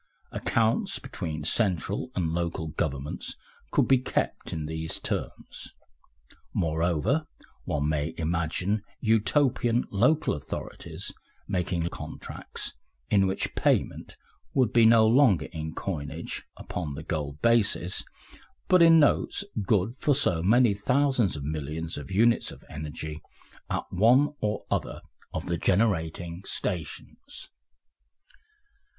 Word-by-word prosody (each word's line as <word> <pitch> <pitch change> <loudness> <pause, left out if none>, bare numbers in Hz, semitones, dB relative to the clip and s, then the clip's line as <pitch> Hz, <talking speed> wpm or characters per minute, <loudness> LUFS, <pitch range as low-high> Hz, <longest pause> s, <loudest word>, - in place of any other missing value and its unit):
Accounts 115 -1 +1
between 80 -1 -5
central 95 - 0
and 80 -4 0
local 85 -2 -2
governments 70 -2 -3 0.3
could - - +2
be 135 -1 +5
kept 125 - -2
in 80 - -3
these 80 +1 -4
terms. - - -5 0.8
Moreover, 85 - +1 0.4
one 75 -1 0
may 75 +1 -1
imagine 85 +5 0 0.2
Utopian 115 +2 +2
local 125 +10 +3
authorities 75 -1 -6 0.4
making 90 -2 -1
contracts - - -6 0.4
in 100 -2 +4
which 95 - -1
payment - - 0 0.4
would 130 -5 +3
be 115 -2 +7
no 115 -1 +7
longer 110 - +5
in 80 -2 -5
coinage 75 -7 -4
upon 75 -5 -5
the 80 - -7
gold 75 -2 -3
basis, 105 -6 +2 0.6
but 185 -1 +5
in 165 -1 +8
notes 150 +6 +2 0.2
good 105 +1 +2
for 145 - +3
so 90 - +2
many 115 +4 +5
thousands 125 - +1
or - - -6
millions 75 +2 -4
of 75 - -9
units 115 +5 +3
of - - -13
energy 75 +1 -6 0.5
at - - -1
one 125 +10 +4
or 105 -1 -2
other - - -2 0.3
of 80 - -4
the 85 -1 -1
generating 90 -3 0
stations. 90 -6 -6
90 Hz, 115 wpm, -27 LUFS, 80-115 Hz, 0.8 s, in